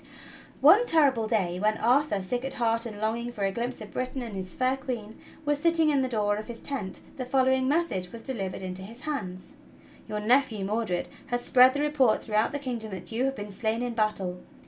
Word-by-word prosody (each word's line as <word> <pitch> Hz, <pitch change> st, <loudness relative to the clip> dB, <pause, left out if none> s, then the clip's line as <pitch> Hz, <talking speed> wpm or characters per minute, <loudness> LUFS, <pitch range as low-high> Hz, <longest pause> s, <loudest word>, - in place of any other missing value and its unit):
One 480 Hz, +4 st, +7 dB
terrible 270 Hz, -9 st, +3 dB
day 185 Hz, -5 st, 0 dB
when 215 Hz, +2 st, +2 dB
Arthur, 245 Hz, -4 st, +2 dB
sick 245 Hz, +6 st, -2 dB
at 270 Hz, -, -4 dB
heart 230 Hz, -1 st, +1 dB
and 210 Hz, -2 st, -8 dB
longing 230 Hz, +3 st, -1 dB
for 210 Hz, -4 st, -4 dB
a 195 Hz, -, +2 dB
glimpse 235 Hz, +4 st, -3 dB
of 210 Hz, -, -9 dB
Britain 255 Hz, 0 st, -3 dB
and 225 Hz, -4 st, -6 dB
his 185 Hz, -1 st, -4 dB
fair 255 Hz, +6 st, +1 dB
Queen, 240 Hz, -6 st, -6 dB, 0.3 s
was 295 Hz, -1 st, +1 dB
sitting 330 Hz, -1 st, +3 dB
in 280 Hz, -2 st, +2 dB
the 260 Hz, -, +1 dB
door 210 Hz, -3 st, +1 dB
of 215 Hz, -, -6 dB
his 235 Hz, -1 st, -7 dB
tent, 235 Hz, -10 st, -4 dB, 0.2 s
the 260 Hz, -, -2 dB
following 260 Hz, 0 st, +2 dB
message 275 Hz, -, 0 dB
was 230 Hz, -1 st, -9 dB
delivered 195 Hz, -8 st, -4 dB
into 185 Hz, 0 st, -5 dB
his 225 Hz, +6 st, -10 dB
hands: 270 Hz, -4 st, -5 dB, 0.5 s
"Your 210 Hz, -, -2 dB
nephew, 225 Hz, -2 st, +2 dB
Mordred, 205 Hz, -3 st, -1 dB, 0.2 s
has 245 Hz, -2 st, -1 dB
spread 255 Hz, +1 st, +6 dB
the 285 Hz, -, 0 dB
report 295 Hz, -6 st, +2 dB
throughout 215 Hz, +1 st, +1 dB
the 285 Hz, -, -2 dB
kingdom 245 Hz, -6 st, -4 dB
that 190 Hz, +2 st, -7 dB
you 235 Hz, +4 st, 0 dB
have 270 Hz, 0 st, -1 dB
been 205 Hz, -2 st, -7 dB
slain 220 Hz, +3 st, -1 dB
in 245 Hz, -1 st, -2 dB
battle. 200 Hz, -5 st, -1 dB
235 Hz, 215 wpm, -28 LUFS, 210-265 Hz, 0.5 s, One